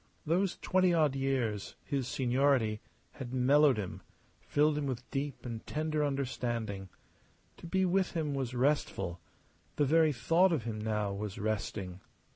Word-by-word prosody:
Those 175 Hz, +4 st, +1 dB
twenty 185 Hz, -2 st, +2 dB
odd 150 Hz, -4 st, +3 dB
years 130 Hz, -7 st, -1 dB
his 135 Hz, -3 st, -2 dB
seniority 125 Hz, -4 st, +2 dB, 0.3 s
had 130 Hz, -1 st, -7 dB
mellowed 135 Hz, +1 st, +5 dB
him, 100 Hz, -4 st, -5 dB, 0.4 s
filled 150 Hz, +1 st, +2 dB
him 145 Hz, -1 st, -1 dB
with 125 Hz, -2 st, -4 dB
deep 140 Hz, -1 st, -3 dB
and 115 Hz, -2 st, -5 dB
tender 155 Hz, 0 st, -1 dB
understanding. 120 Hz, -8 st, -2 dB, 0.7 s
To -, -, -9 dB
be 190 Hz, +2 st, +2 dB
with 185 Hz, +1 st, +1 dB
him 155 Hz, -4 st, -1 dB
was 130 Hz, -3 st, -3 dB
restful; 120 Hz, -, 0 dB, 0.6 s
the 145 Hz, -, +2 dB
very 160 Hz, +2 st, +4 dB
thought 165 Hz, +9 st, +3 dB
of 155 Hz, -8 st, 0 dB
him 110 Hz, -2 st, -4 dB
now 105 Hz, -2 st, -1 dB
was 100 Hz, 0 st, -5 dB
resting. 100 Hz, -3 st, -3 dB
135 Hz, 145 wpm, -32 LUFS, 110-150 Hz, 0.7 s, mellowed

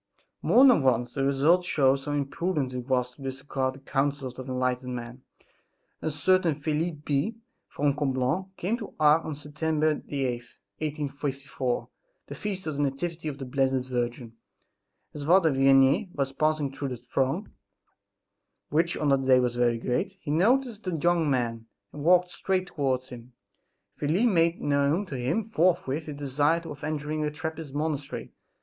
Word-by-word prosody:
More 260 Hz, -, +6 dB
than 250 Hz, -, +6 dB
once 125 Hz, -2 st, +1 dB
the 135 Hz, -, -1 dB
result 140 Hz, +6 st, +3 dB
shows 135 Hz, -5 st, +2 dB
how 145 Hz, -, -2 dB
imprudent 145 Hz, 0 st, -1 dB
it 125 Hz, -1 st, -5 dB
was 125 Hz, -2 st, +1 dB
to 140 Hz, -, -18 dB
disregard 135 Hz, 0 st, -3 dB
the -, -, -12 dB
counsels 135 Hz, -2 st, -2 dB
of 130 Hz, -, -7 dB
that -, -, -4 dB
enlightened 125 Hz, 0 st, -1 dB
man. 120 Hz, +1 st, -7 dB, 0.8 s
A -, -, -1 dB
certain 165 Hz, +2 st, +2 dB
Felix 155 Hz, +2 st, -1 dB
B. 145 Hz, +11 st, 0 dB, 0.3 s
from 145 Hz, -1 st, 0 dB
Coblone, 135 Hz, +6 st, -1 dB
came 210 Hz, +7 st, -1 dB
to 220 Hz, -, -9 dB
Ars 150 Hz, +1 st, +5 dB
on 155 Hz, -, -4 dB
Sept. 150 Hz, +1 st, -13 dB
8th, 155 Hz, -1 st, +1 dB
1854, 135 Hz, +1 st, -3 dB, 0.4 s
the -, -, -8 dB
feast 195 Hz, -2 st, -4 dB
of 155 Hz, -3 st, -3 dB
the -, -, 0 dB
Nativity 160 Hz, +4 st, -2 dB
of 145 Hz, -2 st, -4 dB
the 135 Hz, -, -6 dB
Blessed 130 Hz, 0 st, 0 dB
Virgin. 120 Hz, -1 st, -3 dB, 0.8 s
As 150 Hz, -, -6 dB
Father 170 Hz, 0 st, +5 dB
Vianney 135 Hz, +6 st, +4 dB
was 135 Hz, -2 st, -1 dB
passing 155 Hz, -1 st, +1 dB
through 140 Hz, +1 st, -4 dB
the 125 Hz, -2 st, -4 dB
throng, 135 Hz, -, -2 dB, 1.2 s
which 165 Hz, +3 st, +1 dB
on 150 Hz, -, +1 dB
that 135 Hz, -1 st, +2 dB
day 130 Hz, -1 st, +6 dB
was 125 Hz, -1 st, 0 dB
very 120 Hz, -1 st, +2 dB
great, 125 Hz, +11 st, -2 dB
he 150 Hz, -, -5 dB
noticed 225 Hz, -, +2 dB
the 180 Hz, -2 st, -1 dB
young 165 Hz, 0 st, +2 dB
man, 115 Hz, -4 st, -1 dB, 0.3 s
and 145 Hz, -, -7 dB
walked 180 Hz, +2 st, +4 dB
straight 185 Hz, 0 st, -1 dB
towards 130 Hz, -6 st, -2 dB
him. 125 Hz, 0 st, -11 dB, 0.6 s
Felix 160 Hz, +10 st, +1 dB
made 170 Hz, -6 st, +3 dB
known 145 Hz, +6 st, +1 dB
to 145 Hz, -, -6 dB
him 130 Hz, -, -1 dB
forthwith 165 Hz, -5 st, +1 dB
his 150 Hz, -2 st, -6 dB
desire 145 Hz, +4 st, +1 dB
of 150 Hz, -4 st, -9 dB
entering 155 Hz, 0 st, -2 dB
a 150 Hz, -, 0 dB
Trappist 160 Hz, -1 st, -6 dB
monastery. 150 Hz, -2 st, -3 dB
145 Hz, 165 wpm, -27 LUFS, 130-160 Hz, 1.2 s, More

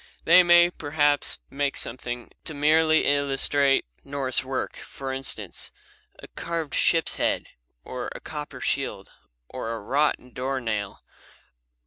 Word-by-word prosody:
They 175 Hz, +2 st, +8 dB
may, 175 Hz, 0 st, +6 dB
perhaps, 145 Hz, -2 st, +1 dB
make 140 Hz, 0 st, -1 dB
something 120 Hz, 0 st, -5 dB
to 155 Hz, -, -5 dB
merely 155 Hz, +2 st, +4 dB
illustrate 140 Hz, 0 st, +2 dB, 0.2 s
Norse 135 Hz, -3 st, -1 dB
work; 130 Hz, 0 st, -3 dB
for 135 Hz, -1 st, -6 dB
instance, 135 Hz, 0 st, -4 dB, 0.5 s
a -, -, -11 dB
carved 165 Hz, -3 st, -4 dB
ship's 165 Hz, -1 st, +3 dB
head, -, -, 0 dB, 0.4 s
or 125 Hz, -1 st, -5 dB
a -, -, -6 dB
copper 150 Hz, -1 st, -7 dB
shield, -, -, -2 dB, 0.4 s
or 115 Hz, -, -5 dB
a -, -, -5 dB
wrought 130 Hz, +1 st, 0 dB
door 130 Hz, +1 st, -2 dB
nail. 105 Hz, -4 st, -3 dB
140 Hz, 125 wpm, -26 LUFS, 130-155 Hz, 0.5 s, They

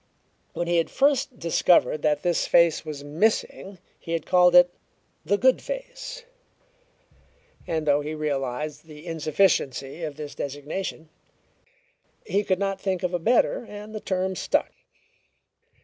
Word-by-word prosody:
When 175 Hz, -, -2 dB
he 175 Hz, 0 st, +1 dB
had 165 Hz, -, +1 dB
first 275 Hz, -1 st, +1 dB
discovered 170 Hz, -2 st, +3 dB
that 150 Hz, -1 st, +1 dB
this 175 Hz, -2 st, +1 dB
face 170 Hz, -2 st, +4 dB
was 150 Hz, -3 st, -7 dB
missing 190 Hz, +4 st, -1 dB, 0.2 s
he 165 Hz, -, -6 dB
had 165 Hz, -2 st, -2 dB
called 180 Hz, -1 st, +4 dB
it 175 Hz, 0 st, +7 dB, 0.5 s
"the 195 Hz, +6 st, +1 dB
good 260 Hz, +4 st, +3 dB
face;" -, -, -7 dB, 1.4 s
and 160 Hz, -2 st, -2 dB
though 145 Hz, 0 st, +3 dB
he 150 Hz, +2 st, -5 dB
realized 150 Hz, 0 st, -3 dB
the 150 Hz, +1 st, -12 dB
insufficiency 155 Hz, -3 st, 0 dB
of 155 Hz, -3 st, -4 dB
this 150 Hz, -1 st, -7 dB
designation 150 Hz, +4 st, -5 dB, 1.2 s
he 205 Hz, -, 0 dB
could 185 Hz, -2 st, +1 dB
not 195 Hz, 0 st, -2 dB
think 190 Hz, -2 st, -2 dB
of 180 Hz, 0 st, -1 dB
a 175 Hz, -, 0 dB
better, 235 Hz, +6 st, +2 dB
and 210 Hz, +1 st, -9 dB
the 215 Hz, -, -4 dB
term 190 Hz, -1 st, -2 dB
stuck. -, -, 0 dB
170 Hz, 140 wpm, -25 LUFS, 150-195 Hz, 1.4 s, it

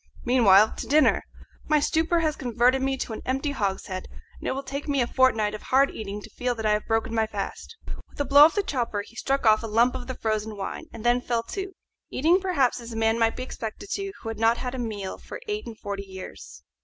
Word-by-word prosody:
Meanwhile, 220 Hz, -4 st, +6 dB
to -, -, -5 dB
dinner! 305 Hz, +2 st, +4 dB, 0.4 s
My 305 Hz, 0 st, +4 dB
stupor 325 Hz, +3 st, +1 dB
has 310 Hz, -2 st, 0 dB
converted 250 Hz, +1 st, +2 dB
me 270 Hz, 0 st, +1 dB
into 255 Hz, -3 st, -4 dB
an -, -, -6 dB
empty 270 Hz, +3 st, -1 dB
hogshead, 190 Hz, -5 st, -3 dB, 0.3 s
and -, -, -6 dB
it -, -, 0 dB
will 270 Hz, +1 st, -4 dB
take 280 Hz, +2 st, -5 dB
me 280 Hz, -2 st, +1 dB
a 245 Hz, -, +3 dB
fortnight 225 Hz, -5 st, +2 dB
of 215 Hz, -, -6 dB
hard 275 Hz, +2 st, +3 dB
eating 205 Hz, -1 st, -6 dB
to -, -, -10 dB
feel 245 Hz, +2 st, -2 dB
that 220 Hz, -1 st, -5 dB
I 215 Hz, -, +3 dB
have 210 Hz, 0 st, 0 dB
broken 225 Hz, 0 st, 0 dB
my 220 Hz, -1 st, +1 dB
fast." 210 Hz, -, -6 dB, 0.3 s
With -, -, -18 dB
a 285 Hz, -, +1 dB
blow 285 Hz, +1 st, +8 dB
of 320 Hz, -, +2 dB
the 410 Hz, -, +1 dB
chopper 235 Hz, -, -2 dB
he 230 Hz, -, -18 dB
struck 270 Hz, +1 st, -1 dB
off 215 Hz, -1 st, +5 dB
a 225 Hz, -, -4 dB
lump 230 Hz, +3 st, +3 dB
of 250 Hz, -1 st, -6 dB
the 260 Hz, -, -4 dB
frozen 215 Hz, -1 st, -2 dB
wine, 195 Hz, -, -5 dB
and 225 Hz, -, -9 dB
then 240 Hz, +1 st, +3 dB
fell 235 Hz, -2 st, -1 dB
to, 385 Hz, -1 st, -4 dB, 0.4 s
eating 335 Hz, +7 st, +3 dB
perhaps 285 Hz, -11 st, +1 dB
as 235 Hz, 0 st, -9 dB
a -, -, -6 dB
man 225 Hz, +1 st, +2 dB
might 225 Hz, 0 st, +2 dB
be 255 Hz, -, -4 dB
expected 240 Hz, -, -7 dB
to -, -, -1 dB
eat 390 Hz, 0 st, -5 dB
who 225 Hz, -, -5 dB
had 225 Hz, -1 st, -6 dB
not 225 Hz, +1 st, +4 dB
had 250 Hz, 0 st, -4 dB
a 260 Hz, -, -4 dB
meal 210 Hz, -5 st, -4 dB
for -, -, -9 dB
eight 420 Hz, 0 st, -3 dB
and 225 Hz, -2 st, -8 dB
forty 200 Hz, -2 st, -5 dB
years. 190 Hz, -1 st, -10 dB
240 Hz, 250 wpm, -26 LUFS, 220-275 Hz, 0.4 s, blow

